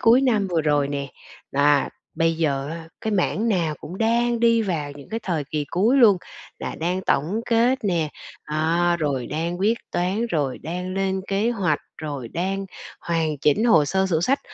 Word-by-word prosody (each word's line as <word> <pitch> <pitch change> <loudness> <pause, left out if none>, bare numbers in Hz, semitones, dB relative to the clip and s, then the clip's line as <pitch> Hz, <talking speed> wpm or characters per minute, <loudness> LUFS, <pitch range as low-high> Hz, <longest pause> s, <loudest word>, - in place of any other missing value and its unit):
cuối 235 +3 +6
năm 220 -7 +2
vừa 170 -2 +2
rồi 145 -2 +2
nè, 140 -1 -3 0.4
à, 140 0 +3 0.3
bây 165 0 +2
giờ 140 -4 0
á 165 0 -7
cái 220 - -2
mảng 205 +4 +1
nào 170 -7 +1
cũng 180 +5 -8
đang 235 +1 +2
đi 230 -1 +4
vào 155 -7 -2
những 140 -1 -13
cái 225 +1 -3
thời 165 -6 -1
kỳ 150 -1 -1
cuối 215 +9 +3
luôn, 225 -7 +7 0.4
là - - -4
đang 180 +3 0
tổng 170 +11 +1
kết 240 +3 +3
nè, 170 -5 +1 0.4
à, 165 +3 +1
rồi 135 -5 -1
đang 165 +5 -3
quyết 220 +4 +2
toán, 190 +6 0
rồi 145 - -1
đang 180 +3 -5
lên 190 0 0
kế 205 +4 +1
hoạch, 180 -10 +1 0.2
rồi 145 -6 -5
đang 190 +6 -2 0.3
hoàn 160 -3 -1
chỉnh 150 - +2
hồ 165 -11 +5
sơ 190 +6 +1
sổ 165 -4 +1
sách. 275 +8 +2
175 Hz, 185 wpm, -23 LUFS, 150-215 Hz, 0.4 s, luôn